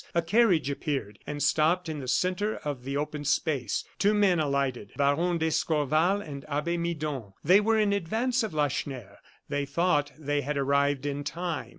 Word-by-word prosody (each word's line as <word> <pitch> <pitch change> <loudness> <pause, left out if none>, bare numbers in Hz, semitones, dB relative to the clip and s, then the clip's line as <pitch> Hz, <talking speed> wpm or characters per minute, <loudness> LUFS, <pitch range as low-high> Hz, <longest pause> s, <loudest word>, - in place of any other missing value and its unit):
A 170 - +2
carriage 185 - +3
appeared, 135 -7 -3
and 145 -1 -3
stopped 160 +4 +2
in 155 -2 -4
the 130 - -6
centre 185 +9 0
of 140 -4 -3
the 140 +1 -2
open 150 0 -3
space. 140 - 0 0.2
Two 205 +1 +3
men 195 -5 +3
alighted; 140 -7 -1
Baron 160 +5 +2
d'Escorval 160 +3 +1
and 140 -7 -8
Abbe 150 +4 -1
Midon. 155 - -3
They 185 +6 +6
were 225 +1 +2
in 210 -2 +2
advance 225 +7 0
of 220 - -2
Lacheneur. 135 -8 -3 0.3
They 145 -1 -2
thought 145 -1 +1
they 145 -1 -1
had 145 +1 -3
arrived 140 0 +1
in 145 0 -2
time. 170 +3 -4
150 Hz, 170 wpm, -28 LUFS, 140-175 Hz, 0.3 s, They